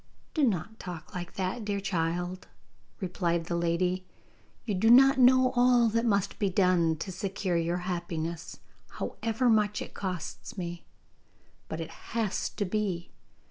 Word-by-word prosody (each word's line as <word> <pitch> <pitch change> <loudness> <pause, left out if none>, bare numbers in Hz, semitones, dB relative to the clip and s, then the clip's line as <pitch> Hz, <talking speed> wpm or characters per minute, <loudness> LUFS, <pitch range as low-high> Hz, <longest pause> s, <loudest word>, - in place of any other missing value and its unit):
'Do 310 - +1
not 220 - 0
talk 170 -3 -8
like 175 -2 -6
that, 190 +5 -2
dear 205 -1 -1
child,' 175 0 -2 0.5
replied 170 -3 -1
the 170 - -2
lady; 175 +2 0 0.6
'you 215 - -1
do 205 +4 +3
not 270 +3 +7
know 255 0 +6
all 245 -1 +5
that 230 +2 +1
must 200 -3 +1
be 200 - +2
done 180 -3 +3
to 190 +4 -5
secure 190 0 -2
your 170 +1 +1
happiness, 170 -2 -4 0.4
however 230 +2 -1
much 210 -2 +3
it - - -7
costs 185 0 -5
me. 170 -2 -5 0.9
But 160 - -4
it 165 - -5
has 220 -3 -2
to 205 - -3
be. 185 -3 -2
185 Hz, 145 wpm, -29 LUFS, 170-220 Hz, 0.9 s, not